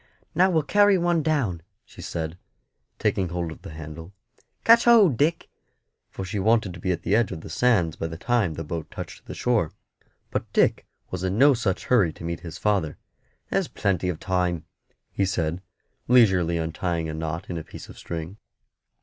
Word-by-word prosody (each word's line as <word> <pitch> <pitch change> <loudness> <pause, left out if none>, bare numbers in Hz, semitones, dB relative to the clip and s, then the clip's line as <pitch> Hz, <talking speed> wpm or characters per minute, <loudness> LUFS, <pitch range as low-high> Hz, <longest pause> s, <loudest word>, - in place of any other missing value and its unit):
"Now 185 +4 +4
we'll 160 -4 +2
carry 205 +5 +4
one 175 -2 +2
down," 135 - 0 0.2
she - - -13
said, 80 0 -4 0.6
taking 95 -2 0
hold 85 -1 -3
of - - -11
the - - -9
handle. 80 +3 -9 0.5
"Catch 230 +1 +6
hold, 220 - +6
Dick;" 160 +7 +1 0.6
for 95 - -6
she 100 +2 -3
wanted 110 -2 +2
to 90 - -10
be 95 +2 -1
at 85 - -3
the 95 - +2
edge 115 -2 +2
of 80 - -6
the - - -9
sands 95 -11 +2
by 80 - -2
the 80 0 -7
time 115 -5 +1
the 80 - -4
boat 80 +1 -5
touched - - -8
the - - -6
shore. 115 -10 +1 0.6
But - - -3
Dick - - +2 0.2
was 90 0 -4
in 95 +2 -1
no 140 +3 +7
such 110 -7 -1
hurry 105 -10 +3
to - - -12
meet 85 0 -3
his 85 -2 -8
father. 95 -8 0 0.5
"There's - - +1
plenty 90 -2 -1
of 85 -3 -3
time," 90 -3 -1 0.5
he 100 - 0
said, 85 -2 -1 0.5
leisurely 95 -9 +4
untying 80 0 -2
a 80 - -4
knot 80 +2 -4
in 85 - -4
a - - -7
piece - - -11
of - - -13
string. 85 +3 -6
90 Hz, 190 wpm, -25 LUFS, 80-120 Hz, 0.6 s, no